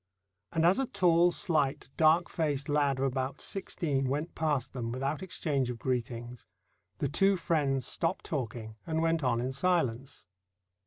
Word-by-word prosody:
And 165 -1 +1
as 180 +8 +5
a 270 - 0
tall, 175 -2 +4
slight, 150 -6 0
dark 160 +2 +4
faced 145 -4 -1
lad 145 -2 +2
of 135 - 0
about 135 +1 -2
sixteen 145 -8 -2
went 150 +5 -2
past 150 -5 -1
them 115 -3 -3
without 135 +6 -2
exchange 150 -8 -1
of 120 - -4
greetings, 120 -1 -3 0.5
the 140 - 0
two 195 +7 +3
friends 145 -6 0
stopped 165 - -1
talking 115 -6 -4
and 160 0 0
went 165 -1 +1
on 120 -3 +2
in 125 +2 -1
silence. 140 -4 -1
140 Hz, 155 wpm, -30 LUFS, 130-165 Hz, 0.5 s, as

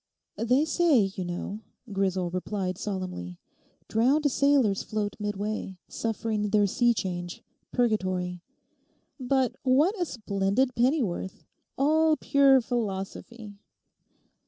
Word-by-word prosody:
'They 250 +6 +2
say, 315 -3 +3 0.2
you 185 - -3
know,' 175 +4 -5 0.3
Grisel 190 -3 0
replied 185 0 -3
solemnly, 185 - -5 0.5
'drowned 275 +6 +2
sailors 270 -8 +3
float 210 -2 -3
midway, 205 -1 -3
suffering 220 -2 -2
their 205 0 +3
sea 240 +4 +2
change; 175 -5 -4 0.3
purgatory. 185 -7 0 0.8
But 255 -1 0
what 280 +8 +3
a - - +2
splendid 215 - 0
pennyworth. 235 - 0 0.3
All 310 +3 +3
pure 275 -2 +4
philosophy! 215 -1 -5
215 Hz, 100 wpm, -27 LUFS, 190-260 Hz, 0.8 s, pure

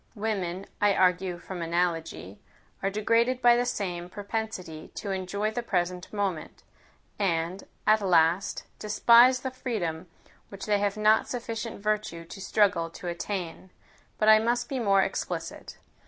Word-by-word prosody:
Women, 195 -4 -2 0.2
I 205 -1 +4
argue 180 -1 +2
from 175 +1 -7
analogy, 165 - -2 0.4
are 195 - +1
degraded 230 +5 +1
by 240 -1 +6
the 245 +1 +1
same 175 -6 -3
propensity 200 -6 -5
to 200 - -4
enjoy 195 +3 -2
the 240 - -3
present 180 -4 -2
moment; 195 -6 -3 0.6
and, 175 -1 -1 0.2
at 215 0 +4
last, 180 0 +2 0.2
despise 235 +4 +5
the 260 - -3
freedom 185 -10 -3 0.4
which 200 -1 -8
they 205 -1 +2
have 205 +1 0
not 215 +1 +4
sufficient 230 -3 -5
virtue 210 -6 -2
to 195 +4 -10
struggle 190 -5 +2
to 175 +1 -7
attain. 180 0 -5 0.5
But 215 - +1
I 215 0 +8
must 240 +2 0
be 270 - -2
more 195 -4 +4
explicit. - - -5
200 Hz, 140 wpm, -27 LUFS, 175-220 Hz, 0.6 s, I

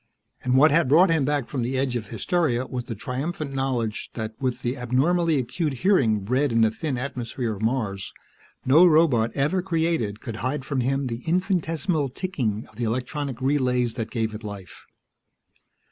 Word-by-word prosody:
And 125 +1 +2
what 150 +2 +6
had 155 -3 +3
brought 165 +5 +6
him 160 -4 +2
back 145 -3 0
from 135 - -3
the 125 +3 -1
edge 130 -2 0
of 110 -3 -3
hysteria 130 - 0
was 125 -1 -5
the 115 - -5
triumphant 140 - -4
knowledge 125 -5 -2
that 110 -1 -4
with 130 -2 -2
the 120 +2 -1
abnormally 150 +7 +1
acute 145 +4 -1
hearing 115 - +4
bred 130 +7 +1
in 115 0 +3
the 110 -1 +4
thin 140 +2 -3
atmosphere 120 -2 -3
of 100 - -10
Mars, 110 -5 -1 0.5
no 145 +7 +6
robot 155 -9 +4
ever 150 +7 +1
created 160 - -1
could 115 -5 -6
hide 130 +3 -2
from 140 -2 -1
him 135 +2 0
the 120 -1 -4
infinitesimal 165 -4 0
ticking 125 - -3
of 105 - -21
the 120 - -3
electronic 130 +3 -2
relays 125 -3 +1
that 115 -3 -4
gave 110 -2 -2
it 105 +1 -8
life. 100 -3 -9
130 Hz, 175 wpm, -24 LUFS, 115-150 Hz, 0.5 s, what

